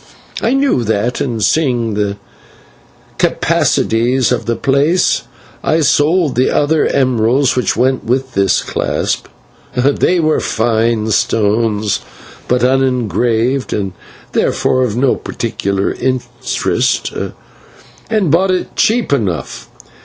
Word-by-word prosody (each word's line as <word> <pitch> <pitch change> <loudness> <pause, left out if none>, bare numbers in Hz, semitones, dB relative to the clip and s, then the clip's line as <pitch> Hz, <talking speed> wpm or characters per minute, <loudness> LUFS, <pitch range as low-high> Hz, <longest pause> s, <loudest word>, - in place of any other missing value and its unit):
I 245 - +1
knew 270 - +1
that, 110 +3 -1
and, 115 -5 -2
seeing 120 -7 +1
the 100 -1 -1 1.0
capacities 120 +3 +1
of 125 - -1
the 115 - +1
place, 145 +8 +2 0.4
I 160 +1 +2
sold 155 +1 +2
the 125 +1 +2
other 150 +1 +2
emeralds 130 0 +2
which 125 -5 0
went 130 +2 +1
with 130 +2 -1
this 95 -1 +2
clasp - - -2 0.5
they 140 +7 +2
were 155 -1 +2
fine 110 -1 0
stones, 105 -1 +1 0.5
but 125 0 +1
unengraved, 125 -1 +1
and 95 -3 -2 0.4
therefore 130 - +1
of 120 -3 -1
no 130 +1 +2
particular 100 -4 -2
interest 125 -2 -1 1.0
and 210 -8 +1
bought 185 +4 +3
it 185 -1 -2
cheap 225 -7 +1
enough. 100 - -3
125 Hz, 110 wpm, -15 LUFS, 110-140 Hz, 1.0 s, bought